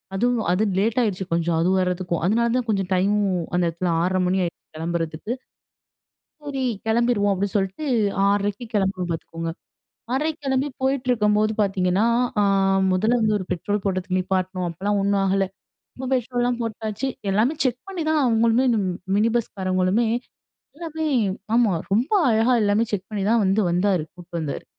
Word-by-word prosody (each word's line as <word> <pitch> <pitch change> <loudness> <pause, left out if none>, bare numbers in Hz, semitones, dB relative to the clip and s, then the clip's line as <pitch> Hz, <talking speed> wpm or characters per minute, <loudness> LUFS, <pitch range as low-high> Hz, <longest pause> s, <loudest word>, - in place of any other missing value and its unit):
அதுவும். 240 +2 +1
அது 205 +4 +1 0.2
லேட் 225 +5 +1
ஆயிடுச்சு 195 -5 -1
கொஞ்சம் 170 0 +1
அது 170 +2 +2
வரதுக்கும். 180 -2 -1
அதனால 230 +5 +2
தான் 245 -2 -2
கொஞ்சம் 195 -3 0
டைமும் 195 0 +1 0.2
அந்த 180 - +2
இடத்துல 170 +1 -2
6:30 185 +1 +1
மணி 190 +1 +1
ஆயிடுச்சு 170 - -5
கிளம்புறதுக்கு. 165 +4 -3 1.1
சரி, 275 -3 -3 0.2
கிளம்பிருவோம் 225 -3 +2
அப்டின்னு 195 +1 -2
சொல்லிட்டு 195 +10 -2 0.4
6:30க்கு 205 +3 -1
கிளம்புவோம் 190 -3 0
பாத்துக்கோங்க 165 0 -5 0.6
6:30க்கு 305 +3 -1
கிளம்பி 265 +1 +1
போயிட்டிருக்கும்போது 220 -5 +2
பாத்தீங்கன்னா, 190 0 +1 0.4
ஆ - - +4 0.5
முதல்ல 215 +7 +2
வந்து 215 -1 +2
ஒரு 185 - -5
பெட்ரோல் 205 +4 -2
போடுறதுக்கு 185 -1 -1
நிப்பாட்டினோம். 185 -1 -1
அப்போலாம் 200 +5 -1
ஒண்ணும் 200 0 +1
ஆகல. 195 0 +2 0.5
அப்பறம் 260 0 -5
பெட்ரோலலாம் 245 -1 -1
போட்டாச்சு 220 +2 -3 0.2
எல்லாமே 220 +10 +2
செக் 250 -1 0
பண்ணிதான் 315 -5 0
அவங்களுமே 230 +2 +3 0.5
மினி 215 +2 +3
பஸ்காரவங்களுமே 190 0 0 0.7
எல்லாமே 320 -1 -5 0.5
ஆமா 235 -5 +4 0.2
ரொம்ப 230 - +1 0.2
அழகா 225 +3 +3
எல்லாமே 205 +2 +3
செக் 195 -2 -3
பண்ணி 205 -2 -3
தான் 230 -2 +3
வந்து 195 +3 +2
வந்தாரு 180 -1 +1
கூட்டு 175 -1 -15
வந்தாரு. 150 -3 -4
205 Hz, 145 wpm, -23 LUFS, 185-235 Hz, 1.1 s, ஆ